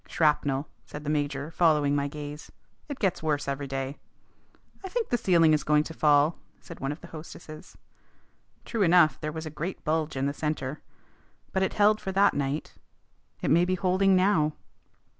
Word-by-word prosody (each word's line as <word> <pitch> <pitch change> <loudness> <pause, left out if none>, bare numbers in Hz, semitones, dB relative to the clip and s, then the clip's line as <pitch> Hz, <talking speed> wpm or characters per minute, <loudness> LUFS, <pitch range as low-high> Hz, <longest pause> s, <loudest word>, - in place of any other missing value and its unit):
"Shrapnel," 150 -2 +1 0.2
said 150 - -9
the 150 - -2
major, 145 0 -2
following 150 -4 +3
my 140 0 0
gaze. 145 +1 -8 0.4
"It 285 - -4
gets 190 -6 0
worse 150 -3 -1
every 140 0 -3
day." 135 +1 -4 0.8
"I 380 - -5
think 460 +2 -2
the - - +2
ceiling 165 -5 +4
is 150 - +1
going 150 0 +3
to 160 - -8
fall," 150 +1 +3 0.2
said 170 - -11
one 135 +1 -2
of 145 - -8
the 170 - -10
hostesses. 155 -1 -11 0.9
True 230 - -3
enough, 175 -4 +5
there 155 -1 -3
was 160 +1 -6
a 155 - -6
great 170 +5 -5
bulge 155 -2 -1
in 135 - 0
the 140 - -1
centre. 150 -2 -3 0.7
But 190 - 0
it 190 - 0
held 210 +1 +3
for 190 - -3
that 200 +1 +4
night. 140 +2 -3 0.7
It - - +1
may 170 +2 +5
be 185 +1 +1
holding 185 +1 +3
now. 185 -5 +3
155 Hz, 180 wpm, -27 LUFS, 145-180 Hz, 0.9 s, enough